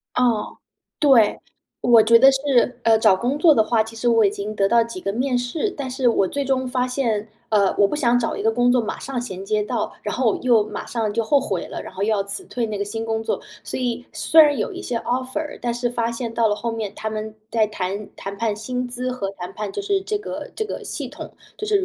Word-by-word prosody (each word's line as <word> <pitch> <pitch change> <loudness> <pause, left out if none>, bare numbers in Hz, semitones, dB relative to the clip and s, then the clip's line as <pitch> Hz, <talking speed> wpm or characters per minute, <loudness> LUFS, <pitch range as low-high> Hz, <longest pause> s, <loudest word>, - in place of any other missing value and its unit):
哦， 240 -4 +1 0.4
对。 260 -8 +5 0.4
我 240 -2 +6
觉 225 +2 +6
得 270 +3 +8
是 270 -3 +1
呃， 225 -1 +5
找 205 -3 +4
工 245 +8 -1
作 320 +1 +6
的 270 - +3
话， 225 0 +2
其 225 +1 -10
实 240 +2 0
我 230 -2 +4
已 195 - +4
经 205 +1 -5
得 195 -2 +2
到 235 +1 +4
几 230 -5 -7
个 195 +2 -2
面 250 +2 0
试， 245 - -1
但 275 -3 -4
是 255 0 -1
我 195 -5 +2
最 280 +6 -2
终 265 -1 0
发 250 0 0
现， 230 -5 -1 0.2
呃， 200 -3 +3
我 200 - +4
不 295 - -2
想 245 -5 +3
找 235 -2 -1
一 - - -4
个 225 - +3
工 245 +1 +3
作 245 0 +4
马 220 - -4
上 265 -2 -3
衔 190 -5 -6
接 210 +1 0
到， 235 +2 -2
然 210 - -3
后 250 -4 +2
我 - - -2
又 235 -4 +4
马 - - -6
上 220 -3 -2
就 230 +1 0
后 280 +5 +3
悔 190 -9 -3
了， - - -6
然 - - -10
后 190 - -9
又 - - -2
要 210 -3 +2
辞 200 - -4
退 245 -9 -3
那 215 -2 -4
个 200 - -1
新 225 +2 -4
工 225 0 -1
作。 225 - -2 0.2
所 - - -4
以 245 +1 -2
虽 320 - +5
然 295 -2 +6
有 215 - -2
一 - - -7
些 245 - -3
offer， 260 +4 -3
但 235 -1 -1
是 240 0 -1
发 235 -1 -1
现 235 -1 -4
到 230 0 +2
了 210 - +2
后 235 +3 -3
面， 220 -3 -4
他 220 0 -4
们 215 0 -5 0.2
在 220 -2 +2
谈 200 0 -4
谈 200 +1 -7
判 220 0 0
薪 250 +4 -3
资 250 +1 -3
和 250 -6 -3
谈 180 -2 -8
判 210 -2 -5
就 - - -4
是 400 -1 +1
这 420 +2 -2
个 415 - -7
这 440 - -2
个 425 - -6
系 - - -5
统 - - -9 0.3
就 425 - -4
是 405 -3 +2
235 Hz, 290 characters per minute, -22 LUFS, 215-255 Hz, 0.4 s, 得